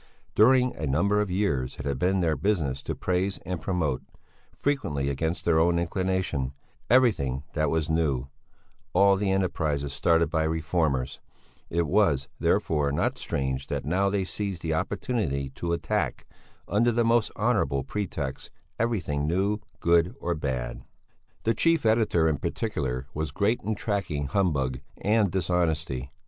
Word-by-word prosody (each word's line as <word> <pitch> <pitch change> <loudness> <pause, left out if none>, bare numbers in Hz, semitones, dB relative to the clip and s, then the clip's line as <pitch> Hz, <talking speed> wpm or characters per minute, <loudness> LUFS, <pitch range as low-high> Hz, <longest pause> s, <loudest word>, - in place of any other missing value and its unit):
During 125 +3 +5
a 75 - -3
number 100 +10 +2
of 105 - -2
years 90 -10 -1
it 70 - -6
had 70 -2 -1
been 95 +3 +2
their 80 -3 +2
business 75 -11 0
to - - -4
praise 95 +2 0
and 90 -3 -3
promote, 80 -8 -1 0.5
frequently 75 - -1
against 80 +4 -2
their 80 -2 +4
own 85 +1 +3
inclination, 85 -6 -1 0.4
everything 95 - +3
that 75 -2 +1
was 80 -1 0
new, 75 -5 0 0.7
all 100 +1 +5
the 100 0 0
enterprises 80 -7 0
started 85 -1 +2
by 80 - +1
reformers; 80 -5 0 0.5
it 85 0 +1
was, 80 -6 +2
therefore, 75 -3 +1
not 70 - 0
strange 65 0 -2
that - - -3
now 95 +6 +2
they 100 -1 0
seized 95 -2 -4
the 80 -1 0
opportunity 70 - -1
to 85 +5 -4
attack 85 -1 -1 0.4
under 115 +4 +3
the 120 0 +2
most 115 -1 +3
honourable 100 - +1
pretexts 80 -8 -4 0.3
everything 85 -11 0
new, 100 +5 +1 0.2
good 85 +1 +3
or 85 - -1
bad. 65 -6 -3 0.6
The 115 - +2
chief 165 +3 +2
editor 110 -7 +3
in 75 -3 0
particular 65 - -2
was 80 0 -2
great 100 - 0
in 110 +1 -2
tracking 95 -9 -2
humbug 70 -6 0 0.2
and 105 -1 +2
dishonesty. 80 -7 -1
85 Hz, 145 wpm, -27 LUFS, 70-100 Hz, 0.7 s, During